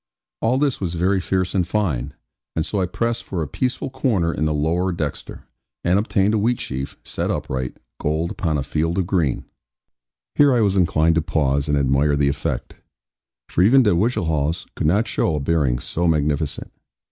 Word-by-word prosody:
All 120 +3 +2
this 140 -5 0
was 90 -3 -2
very 95 +3 +1
fierce 95 +1 -1
and 90 -3 +1
fine; 75 - -1 0.4
and 80 - 0
so 100 +1 -1
I 90 - 0
pressed 115 +5 -2
for 85 -4 -3
a - - -4
peaceful 130 - -2
corner 110 -11 0
in 75 - -1
the 75 - +1
lower 80 +5 0
dexter, 80 -4 -5 0.4
and 90 +3 +3
obtained 105 -1 +1
a 110 - +2
wheat 120 +3 +1
sheaf 65 +1 -5
set - - -3
upright, 65 -1 -3 0.2
gold 80 +4 -1
upon 85 -7 -1
a 70 - -1
field 80 +5 -1
of 95 - +1
green. 85 -8 0 0.9
Here 145 -3 +5
I 120 - +3
was 100 -2 +2
inclined 85 -3 +3
to 85 - +2
pause, 70 -3 0
and 75 - +2
admire 70 +2 +2
the 70 -1 +2
effect; 70 - -3 0.7
for - - 0
even 125 +8 +6
De 105 - +3
Whichehalse 80 - 0
could - - -1
not 105 +8 +2
show 80 - 0
a - - -1
bearing 70 -4 +1
so 85 +7 -2
magnificent. 75 -2 0
85 Hz, 185 wpm, -22 LUFS, 75-100 Hz, 0.9 s, even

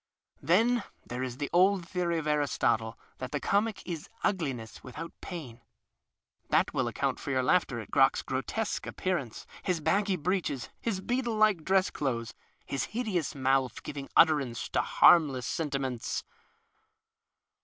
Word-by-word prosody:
Then 225 - +3 0.2
there 125 +1 -5
is 125 -1 -4
the 145 0 -3
old 185 0 +4
theory 175 -2 -1
of 160 - -3
Aristotle, 140 -6 +1 0.2
that 130 -1 -5
the 145 - -1
comic 205 +4 0
is 165 -4 -5
ugliness 135 - -2
without 150 +6 -7
pain. 135 -10 -7 0.9
That - - +2
will - - 0
account - - -1
for - - -6
your 130 -2 +1
laughter 135 -4 +2
at 110 - -9
Crock's 135 -1 +4
grotesque 200 +12 -2
appearance, 170 - -3 0.2
his 180 -3 0
baggy 195 +5 +1
breeches, 165 - -1
his 200 -5 -2
beetle 240 +1 -1
like 215 -6 +3
dress 190 +1 +2
clothes, 120 -5 -2 0.3
his 140 - -2
hideous 215 - -2
mouth 135 -1 +1
giving 140 -1 -6
utterance 145 -8 +3
to - - +1
harmless 140 -7 +5
senti 145 +2 -1
ments. 130 -4 -3
155 Hz, 145 wpm, -29 LUFS, 130-185 Hz, 0.9 s, harmless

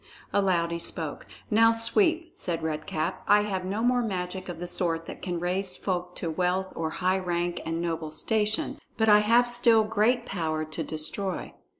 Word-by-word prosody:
Aloud 180 -4 +2
he 170 - -2
spoke: 160 -2 -3 0.2
"Now, 225 +1 +6
Sweep," 330 - +3
said 165 -2 -3
Red 155 -1 -3
Cap, 160 +4 -2
"I 205 0 +6
have 190 -3 -2
no 205 +4 -2
more 245 0 +3
magic 185 -3 -4
of 170 -2 -6
the 175 - -4
sort 165 -2 -1
that - - -9
can 175 -2 -3
raise 180 +2 -1
folk 180 -2 -3
to 165 - -3
wealth 180 +3 -1
or 160 -1 -2
high 185 +3 0
rank 175 -1 -2
and 165 0 -2
noble 165 -2 -2
station; 215 +7 -1 0.2
but 220 -1 +3
I 210 0 +8
have 230 +3 +4
still 235 -2 +4
great 225 +3 +1
power 160 -7 -2
to 155 +1 -4
destroy. 160 +6 -3
185 Hz, 185 wpm, -27 LUFS, 170-215 Hz, 0.2 s, I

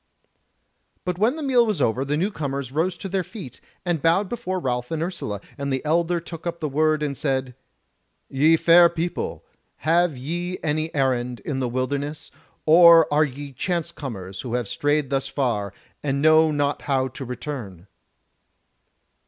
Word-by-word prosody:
But 180 -1 -2
when 230 +7 +3
the 315 - -5
meal 255 -3 +4
was 215 -4 -1
over, 120 +4 +1
the 145 +2 -1
new 190 +6 0
comers 140 - -4
rose 170 +5 0
to - - -6
their 190 0 -1
feet, 170 - -10 0.2
and 175 -4 0
bowed 180 +5 +2
before 220 -6 -3
Ralph 125 -5 -2
and 160 -1 -2
Ursula, 165 - -4 0.2
and 140 0 -2
the 130 +2 -2
elder 170 +2 +1
took 165 0 -8
up 170 0 -4
the 155 - -2
word 155 +2 +1
and 140 -2 -2
said: 130 -2 -1 0.7
"Ye 155 +4 +4
fair 170 +1 +7
people, 170 +1 -4 0.3
have 165 -2 +1
ye 175 +7 -4
any 155 +1 -1
errand 125 -3 0
in 135 +2 -3
the 125 -2 -1
wilderness, 140 +4 -3 0.3
or 165 0 +8
are 150 +1 +5
ye 140 0 -8
chance 170 +4 -2
comers 100 - -7
who 120 -1 -4
have 120 -3 -1
strayed 145 +3 0
thus 135 -1 0
far, 115 -8 -1 0.3
and 140 -1 -1
know 155 +1 +5
not 145 -1 0
how 135 -2 0
to 130 +2 -8
return?" 120 - -6
150 Hz, 170 wpm, -23 LUFS, 130-170 Hz, 0.7 s, or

